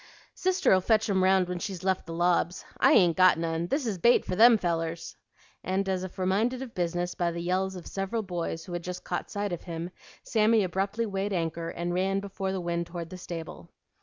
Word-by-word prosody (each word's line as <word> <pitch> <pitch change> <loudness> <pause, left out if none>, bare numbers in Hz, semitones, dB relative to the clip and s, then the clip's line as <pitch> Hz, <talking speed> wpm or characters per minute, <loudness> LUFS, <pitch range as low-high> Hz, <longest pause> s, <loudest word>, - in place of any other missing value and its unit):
"Sister'll 365 - +2
fetch 220 +3 +2
'em 190 -1 +2
round 190 -1 +4
when 180 0 -3
she's 185 0 -5
left 190 -2 0
the - - -6
lobs. 175 0 +1
I - - +6
ain't 175 -6 +5
got 185 -2 +6
none; 165 0 -2
this 275 - -1
is 205 -6 -2
bait 240 +6 +4
for 185 - -2
them 230 +3 +7
fellers." 165 -3 -3 0.5
And, 190 +1 -1
as 185 -1 -1
if 185 - -8
reminded 215 +8 0
of 245 -3 -10
business 175 0 -1
by 175 -1 0
the 170 - -5
yells 185 +2 -1
of 180 - -9
several 195 +3 -3
boys 170 -3 -4
who 175 - -8
had 175 0 -3
just 180 +1 -6
caught - - -4
sight 205 -2 -3
of 175 - -4
him, 170 0 -6 0.3
Sammy 220 -1 +3
abruptly 195 +5 -1
weighed 200 -1 -2
anchor 165 -1 -2
and 175 +1 -3
ran 190 +2 +1
before 195 -1 -4
the 190 - -2
wind 170 0 -2
toward 170 -1 -7
the 185 - -7
stable. 165 - -7
185 Hz, 215 wpm, -28 LUFS, 170-195 Hz, 0.5 s, them